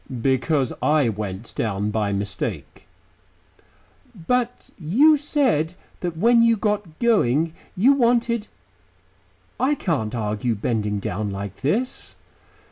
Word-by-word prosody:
"Because 135 +2 +1
I 150 -5 +3
went 105 0 -5
down 105 -1 -1
by 105 -2 0
mistake." 100 0 -4 1.3
"But 245 +7 -2
you 250 - +5
said 255 - 0 0.2
that 175 -2 -4
when 230 +5 +5
you 230 -1 +4
got 205 -6 -2
going, 165 - +2 0.2
you 250 +9 +5
wanted 235 -3 +1 1.1
I 265 +4 +2
can't 135 - -2
argue 110 +1 -1
bending 105 -2 -1
down 100 +1 -3
like 100 0 -6
this." 220 - -2
155 Hz, 110 wpm, -23 LUFS, -, 1.3 s, you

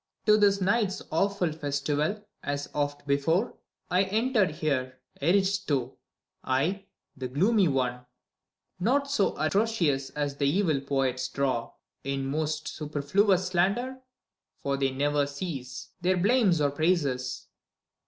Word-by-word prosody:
TO 210 - +6
this 200 -1 +4
night's 200 0 +1
awful 190 0 +1
festival, 150 +6 -1 0.2
as 145 0 -3
oft 145 -1 -2
before, 155 +9 +1 0.4
I 180 +1 +4
enter 220 +1 +2
here, 140 -5 -2 0.2
Eriehtho, 175 -6 +1 0.5
I, 165 +10 0 0.3
the 130 -1 -4
gloomy 190 - +3
one: 125 -3 -1 0.7
Not 275 +8 +1
so 210 -8 +1
atrocious 160 -7 +1
as 145 -1 -3
the 140 - +1
evil 160 -5 +1
poets 135 -2 -1
draw. 130 -4 -1 0.3
In 135 0 -2
most 155 +2 -2
superfluous 175 +6 +1
slander 200 +9 0 0.3
— - - -63
for 140 0 0
they 135 -1 +1
never 145 +2 +1
cease 140 -4 -6
Their 185 +1 +2
blame 210 +2 +3
or 145 -1 +2
praises 140 -5 0
155 Hz, 125 wpm, -28 LUFS, 140-195 Hz, 0.7 s, TO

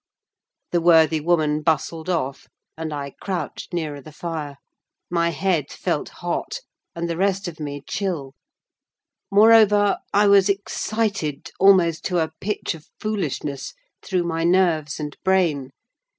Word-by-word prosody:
The 175 - +2
worthy 160 -2 +5
woman 155 -2 +1
bustled 160 +2 -1
off, 140 -6 -2 0.3
and 160 -1 -5
I 140 -1 -4
crouched 190 0 -4
nearer 155 -5 -3
the 155 - -12
fire; 150 -3 -5 0.5
my 170 -1 +2
head 170 -3 0
felt - - -2
hot, - - -4 0.3
and 170 0 -2
the 170 - -2
rest 195 0 0
of 165 -2 -7
me 145 -2 -5
chill: 165 -9 -3 1.0
moreover, 210 -1 +5
I 205 +1 +4
was 200 -1 +5
excited, 200 -5 -2
almost 180 -4 +5
to 180 - 0
a 160 -2 0
pitch 210 -1 -2
of 160 -2 -13
foolishness, 155 - -3 0.3
through 185 -2 -1
my 165 -1 -2
nerves 170 -4 +2
and 150 -1 -5
brain. 170 -8 +2
170 Hz, 135 wpm, -23 LUFS, 155-190 Hz, 1.0 s, worthy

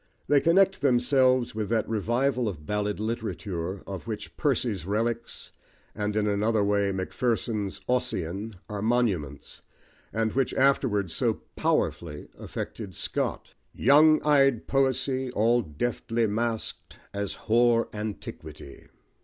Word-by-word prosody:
They 145 0 +4
connect 190 +2 +3
themselves 130 -1 +3
with 105 -2 -3
that 110 -2 +1
revival 120 +3 0
of 75 -6 -8
ballad 105 +3 -1
literature, 100 -5 -4
of 95 +2 -7
which 110 -2 -6
Percy's 120 - 0
Relics, 115 +5 -2 0.4
and, 105 0 -2
in 105 -1 +1
another 105 +1 +1
way, 100 -1 +2
Macpherson's 105 0 -2
Ossian 105 -4 -2
are 105 -1 -5
monuments, 100 - -1 0.5
and 110 -1 0
which 135 0 0
afterwards 120 - +2
so - - 0
powerfully 75 -3 -1
affected 100 -6 -6
Scott - - -3 0.2
Young 155 +2 +6
eyed 135 -5 +4
poesy 130 -1 0
All 115 +3 +3
deftly 115 +6 -2
masked 110 +1 -3 0.2
as 100 -1 -3
hoar 115 0 +3
antiquity. 105 -9 -7
110 Hz, 115 wpm, -27 LUFS, 100-125 Hz, 0.5 s, Young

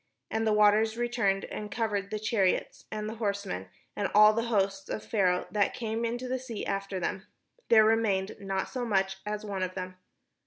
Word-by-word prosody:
And 220 0 0
the - - +3
waters 210 +1 +4
returned, 235 -5 0
and 210 0 -6
covered 205 -3 -1
the 215 - -2
chariots, 210 -3 0
and 215 0 -3
the 220 - -4
horsemen, 200 - -2 0.3
and 200 -2 -1
all 210 +1 +8
the 230 +1 -1
host 195 -4 0
of - - -4
Pharaoh 185 -4 +1
that 205 -1 +1
came 225 0 -2
into 240 +2 -3
the 260 +1 -1
sea 245 -4 -6
after 195 -1 -2
them; 190 +2 -3 0.4
there 220 -2 +7
remained 215 -3 +1
not 195 -1 -2
so 255 -2 -4
much 195 -4 +1
as 210 0 -3
one 200 -2 -3
of 185 0 -2
them. 185 0 -6
210 Hz, 190 wpm, -29 LUFS, 195-225 Hz, 0.4 s, all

